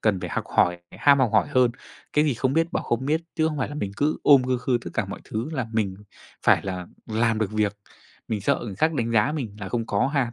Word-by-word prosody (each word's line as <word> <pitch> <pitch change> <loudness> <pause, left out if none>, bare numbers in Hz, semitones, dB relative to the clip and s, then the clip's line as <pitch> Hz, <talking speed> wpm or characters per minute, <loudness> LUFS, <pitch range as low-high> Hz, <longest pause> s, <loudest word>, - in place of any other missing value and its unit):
cần 100 -4 +1
phải - - -4
học - - -2
hỏi, 90 0 +4
phải - - -13
ham 140 -1 +6
học 125 -5 +3
hỏi 105 -5 +3
hơn. 125 -2 +3 0.4
Cái 150 +1 +3
gì 145 -5 +1
không 130 +3 0
biết 165 +2 +1
bảo - - -1
không 120 +3 -1
biết, 160 +3 +1
chứ 160 0 +2
không 150 -2 -4
phải 130 - -1
là 145 - -7
mình 100 -9 -3
cứ 150 +2 +1
ôm 140 -3 +7
khư 125 -1 0
khư 125 -1 0
tất - - -5
cả - - +1
mọi - - -7
thứ 115 +7 -4
là 130 -6 -2
mình 105 -4 0 0.5
phải - - +5
là 90 -2 -4 0.2
làm 110 0 +1
được 110 -3 -1
việc. 105 -1 0 0.5
Mình 105 -2 -1
sợ - - +1
người 100 -4 -6
khác 160 +7 +2
đánh 115 -4 -1
giá 115 +5 +3
mình 120 -10 -4
là 95 - -5
không 115 +1 -2
có 100 +4 +1
ha. 135 -4 0
120 Hz, 275 wpm, -25 LUFS, 105-140 Hz, 0.5 s, ôm